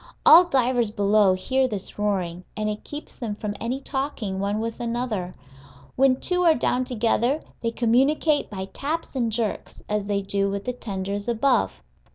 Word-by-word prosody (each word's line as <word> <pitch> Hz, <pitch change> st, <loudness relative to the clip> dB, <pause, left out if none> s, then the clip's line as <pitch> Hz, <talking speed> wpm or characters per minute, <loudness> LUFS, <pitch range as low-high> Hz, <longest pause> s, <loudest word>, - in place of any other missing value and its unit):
All 345 Hz, +3 st, +9 dB
divers 250 Hz, -5 st, +2 dB
below 205 Hz, -1 st, +3 dB
hear 260 Hz, +8 st, +1 dB
this 205 Hz, -3 st, -6 dB
roaring, 185 Hz, -4 st, -1 dB
and 215 Hz, 0 st, -1 dB
it 210 Hz, 0 st, -3 dB
keeps 295 Hz, +1 st, -9 dB
them 225 Hz, -5 st, -3 dB
from 210 Hz, 0 st, -4 dB
any 245 Hz, +3 st, -2 dB
talking 265 Hz, -9 st, -3 dB
one 200 Hz, +2 st, -1 dB
with 230 Hz, +1 st, -4 dB
another: 230 Hz, -6 st, -3 dB, 0.6 s
when 260 Hz, -1 st, +3 dB
two 360 Hz, 0 st, 0 dB
are 330 Hz, -3 st, +5 dB
down 250 Hz, +1 st, 0 dB
together, 245 Hz, +4 st, +1 dB, 0.2 s
they 230 Hz, -, 0 dB
communicate 270 Hz, +7 st, +2 dB
by 190 Hz, -2 st, -5 dB
taps 310 Hz, +2 st, -3 dB
and 235 Hz, -3 st, 0 dB
jerks, 220 Hz, -1 st, -3 dB
as 210 Hz, -1 st, -1 dB
they 200 Hz, -1 st, 0 dB
do 195 Hz, 0 st, 0 dB
with 200 Hz, 0 st, -4 dB
the 250 Hz, -, -2 dB
tenders 200 Hz, -3 st, -4 dB
above. 240 Hz, 0 st, +1 dB
230 Hz, 170 wpm, -24 LUFS, 205-260 Hz, 0.6 s, All